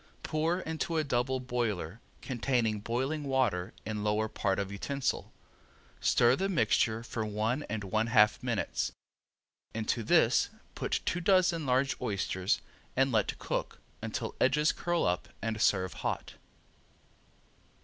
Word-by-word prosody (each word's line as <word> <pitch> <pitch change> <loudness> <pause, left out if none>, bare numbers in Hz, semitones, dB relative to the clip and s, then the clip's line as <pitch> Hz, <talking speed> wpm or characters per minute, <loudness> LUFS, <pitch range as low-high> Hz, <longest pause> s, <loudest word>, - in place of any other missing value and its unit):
Pour 165 +4 0
into 160 0 -2
a 155 - +2
double 130 -1 0
boiler 115 -6 -2 0.2
containing 120 -4 0
boiling 130 +8 -2
water 125 -10 +1
in 105 -1 -3
lower 105 +1 +1
part 95 -2 -1
of 100 -1 -2
utensil. 135 +7 -2 0.7
Stir 120 +1 +4
the 195 +6 -1
mixture 115 - +2
for 115 -1 -3
one 110 +5 -1
and 105 0 -3
one 110 +4 0
half 110 -3 +5
minutes. - - -1 0.8
Into 115 +1 0
this 110 - +4 0.2
put - - -1
two 175 - 0
dozen 180 -4 +3
large 130 +2 +2
oysters 100 -2 0 0.3
and 135 +1 +3
let 110 -2 +1
cook - - -3 0.2
until - - -3
edges 150 +1 +4
curl 175 -1 0
up 90 0 0
and 110 -1 -2
serve 95 -2 +2
hot. - - -3
120 Hz, 130 wpm, -31 LUFS, 105-140 Hz, 0.8 s, half